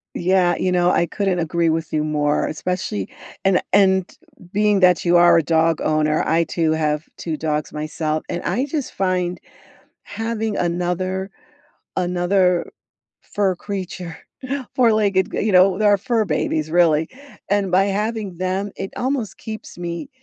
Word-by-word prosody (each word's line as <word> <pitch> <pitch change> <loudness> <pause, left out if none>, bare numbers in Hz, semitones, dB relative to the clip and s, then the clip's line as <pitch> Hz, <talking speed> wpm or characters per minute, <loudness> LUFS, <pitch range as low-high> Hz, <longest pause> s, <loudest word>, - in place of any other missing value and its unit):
Yeah, 180 -1 +2
you 185 - -1
know, 175 -1 +3
I 170 - +2
couldn't 195 +1 -1
agree 170 0 +1
with 160 0 -2
you 155 -1 +1
more, 150 -1 0
especially 155 - -3 0.4
and 190 -1 +4
and 190 -2 +4 0.4
being 210 0 +2
that 180 -1 +4
you 175 0 +5
are 175 -1 +6
a 165 - +3
dog 165 +1 +2
owner, 155 0 +1
I, 165 +1 +2
too, 160 0 0
have 155 -1 0
2 160 -2 -4
dogs 150 -1 -2
myself 155 0 -3
and 175 - -3
I 260 - -1
just 290 -1 -3
find 180 -2 -1 0.6
having 225 -1 -3
another 180 +2 -2 0.7
another 180 0 +1 0.5
fur 195 -2 -1
creature, 185 -4 -6 0.6
four-legged 215 -6 +2
g - - -2
you 210 0 0
know, 185 0 +5
they're 210 -1 +4
our 205 - +5
fur 225 +1 0
babies, 155 -2 -1
really 160 -2 +3 0.4
and 200 -2 +1
by 185 +2 +4
having 205 -2 -2
them, 185 +2 -2
it 195 - -5
almost 255 -4 -2
keeps 220 -1 -8
me 175 +7 -5
180 Hz, 150 wpm, -21 LUFS, 165-200 Hz, 0.7 s, are